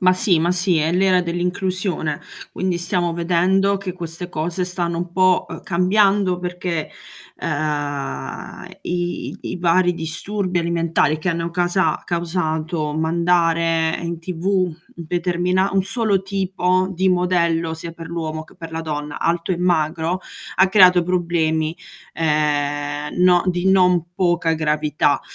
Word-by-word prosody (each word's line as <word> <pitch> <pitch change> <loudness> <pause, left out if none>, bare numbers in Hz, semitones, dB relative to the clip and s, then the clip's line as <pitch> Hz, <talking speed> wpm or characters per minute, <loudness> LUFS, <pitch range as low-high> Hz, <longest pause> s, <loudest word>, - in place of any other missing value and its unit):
Ma 185 -1 +5
sì 185 -3 +2
ma 170 +2 +2
sì, 180 -1 +2
è 155 +1 +1
l'era 185 0 +3
dell'inclusione. 180 -2 -2 0.3
Quindi 185 -1 -1
stiamo 175 0 -1
vedendo 180 +4 +2
che 195 -2 -5
queste 175 0 -6
cose 175 +2 -2
stanno 175 -2 -2
un 175 0 -4
po', 185 0 +3
ehm, - - -8
cambiando 190 +1 +2
perché, 180 -2 -3 0.5
ehm, 145 - -3 0.2
i 175 0 -3
i - - -4
vari 175 +1 +3
disturbi 180 +3 -2
alimentari 170 -2 +1
che 155 - -3
hanno 170 -1 -1
casa 175 -2 +1
causato 160 -2 -2
mandare 165 0 +2
in 170 0 -4
TV, 170 0 -7
un 185 -4 +1 0.2
determina 180 +3 0
un 195 -1 +2
solo 220 -2 +1
tipo 185 -1 0
di 190 +1 +1
modello, 170 -2 +1
sia 165 +1 -7
per 165 0 -9
l'uomo 160 -2 -4
che - - -20
per 165 -2 -9
la 160 - -3
donna, 150 -2 -5
alto 170 +2 0
e - - -1
magro, 170 0 0 0.4
ha 190 +1 +5
creato 185 -2 +6
problemi, 165 -3 0 0.4
ehm, 145 -1 -1
no 180 -1 +5
di 180 +1 +1
non 180 -3 +4
poca 175 -2 +2
gravità. 150 -2 +1
175 Hz, 135 wpm, -21 LUFS, 160-185 Hz, 0.5 s, creato